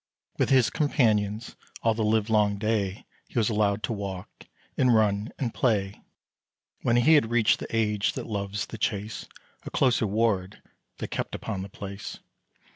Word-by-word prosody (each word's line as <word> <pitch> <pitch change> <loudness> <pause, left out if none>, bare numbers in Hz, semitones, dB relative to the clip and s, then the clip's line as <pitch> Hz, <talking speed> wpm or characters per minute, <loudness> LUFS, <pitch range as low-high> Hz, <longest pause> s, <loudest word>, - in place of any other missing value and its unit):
With - - +2
his 125 -5 +4
companions, 110 -7 +1 0.3
all 115 - +3
the 110 0 -1
live 110 0 +2
long 105 -2 +2
day, 105 -2 -1 0.2
He - - -8
was 110 -2 +3
allowed 105 -1 +1
to 115 - -1
walk, 100 -3 -7 0.3
and 125 -2 +4
run, 105 0 +2
and 120 -4 -2
play. 100 -5 0 0.8
When 120 - +2
he 120 +7 +5
had 145 -8 +4
reached 120 -2 +3
the - - -5
age 105 -2 +1
that - - -5
loves 100 -1 -3
the 115 - -9
chase, 105 +1 -2 0.3
A - - -8
closer 120 -4 +2
ward 100 -3 0 0.4
they - - -4
kept - - -4
upon 95 - -4
the 95 - -6
place. 100 +1 -7
110 Hz, 165 wpm, -27 LUFS, 100-115 Hz, 0.8 s, he